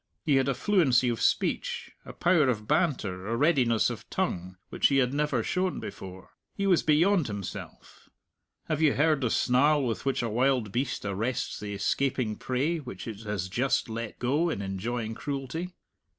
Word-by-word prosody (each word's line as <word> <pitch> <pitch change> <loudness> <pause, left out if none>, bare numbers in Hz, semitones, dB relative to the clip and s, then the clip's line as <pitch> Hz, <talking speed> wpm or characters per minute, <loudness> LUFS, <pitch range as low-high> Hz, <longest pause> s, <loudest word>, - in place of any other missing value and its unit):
He 145 -4 +4
had 135 +1 +2
a 135 - 0
fluency 135 - +3
of 115 - -2
speech, - - 0
a - - -8
power 170 -6 +3
of 105 -3 -2
banter, 125 - 0
a 115 +1 -1
readiness 130 -7 +3
of - - -9
tongue, 90 +1 -2
which - - +3
he 140 - +2
had 130 -1 +2
never 145 -5 0
shown 185 0 -1
before. 95 -2 -9 0.2
He 200 - -1
was 185 -4 +4
beyond 165 +1 +3
himself. 100 -3 -8 0.6
Have 155 -1 -1
you 155 -3 +4
heard 150 -1 +2
the 125 - +1
snarl 140 +5 +3
with 115 -2 -2
which 135 -3 0
a - - 0
wild 125 -1 +1
beast 120 -1 -2
arrests 110 +5 -2
the 105 -1 -5
escaping 120 +2 0
prey 140 +9 -1
which 125 -4 -8
it 110 -3 -6
has 100 -4 -2
just 120 +5 0
let 115 0 -5
go 145 +8 +1
in 100 -11 -3
enjoying 110 +4 -3
cruelty? 140 +7 -4
130 Hz, 175 wpm, -28 LUFS, 110-150 Hz, 0.6 s, He